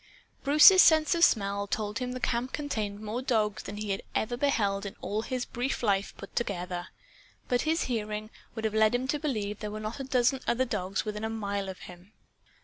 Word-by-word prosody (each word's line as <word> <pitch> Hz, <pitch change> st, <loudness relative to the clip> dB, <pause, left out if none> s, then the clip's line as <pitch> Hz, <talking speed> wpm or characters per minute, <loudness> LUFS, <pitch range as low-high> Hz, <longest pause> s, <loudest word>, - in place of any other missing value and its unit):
Bruce's 305 Hz, +7 st, +8 dB
sense 315 Hz, 0 st, +5 dB
of 340 Hz, -1 st, +1 dB
smell 200 Hz, -, +2 dB
told 210 Hz, +1 st, -2 dB
him 250 Hz, -1 st, -3 dB
the 255 Hz, -, -5 dB
camp 245 Hz, +1 st, -1 dB
contained 215 Hz, -9 st, -3 dB
more 220 Hz, +3 st, -3 dB
dogs 215 Hz, -6 st, 0 dB
than 200 Hz, -, -7 dB
ever 210 Hz, -, -6 dB
he 210 Hz, -, -4 dB, 0.3 s
had 240 Hz, +2 st, -5 dB
beheld 205 Hz, -9 st, +1 dB
in 200 Hz, -, -6 dB
all 210 Hz, +2 st, -2 dB
his 250 Hz, +2 st, -3 dB
brief 250 Hz, +1 st, -3 dB
life 200 Hz, -2 st, 0 dB
put 200 Hz, -, -11 dB
together. 180 Hz, -5 st, -3 dB, 0.6 s
But 245 Hz, -1 st, +1 dB
his 325 Hz, +1 st, +2 dB
hearing 215 Hz, -2 st, -3 dB, 0.2 s
would 220 Hz, -1 st, -4 dB
have 215 Hz, -, 0 dB
led 220 Hz, +1 st, +4 dB
him 255 Hz, +2 st, -1 dB
to 295 Hz, -, 0 dB
believe 215 Hz, -9 st, -2 dB
there 210 Hz, -, -4 dB
were 215 Hz, +1 st, -6 dB
not 215 Hz, +4 st, -5 dB
a -, -, -3 dB
dozen 260 Hz, 0 st, +2 dB
other 255 Hz, +2 st, +2 dB
dogs 195 Hz, -4 st, -2 dB
within 210 Hz, 0 st, -4 dB
a 220 Hz, -, -1 dB
mile 200 Hz, -3 st, -3 dB
of 190 Hz, -, -8 dB
him. 180 Hz, +3 st, -13 dB
220 Hz, 210 wpm, -29 LUFS, 205-255 Hz, 0.6 s, Bruce's